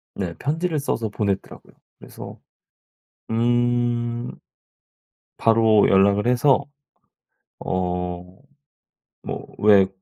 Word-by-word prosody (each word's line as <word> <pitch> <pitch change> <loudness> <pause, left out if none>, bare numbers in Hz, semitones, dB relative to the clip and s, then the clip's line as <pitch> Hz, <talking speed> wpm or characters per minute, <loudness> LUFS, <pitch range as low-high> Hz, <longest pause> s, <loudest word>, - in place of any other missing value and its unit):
네. 90 -4 -4
편지를 160 +2 -1
써서 115 -5 -2
보냈더라고요. 100 -2 -4 0.3
그래서 - - -11 0.9
음 120 0 0 1.1
바로 110 -2 +4
연락을 100 +3 +3
해서 130 +3 +3 0.9
어 90 +1 -4 0.8
뭐 - - -6
왜 100 -2 +5
115 Hz, 155 characters per minute, -22 LUFS, 95-120 Hz, 1.1 s, 왜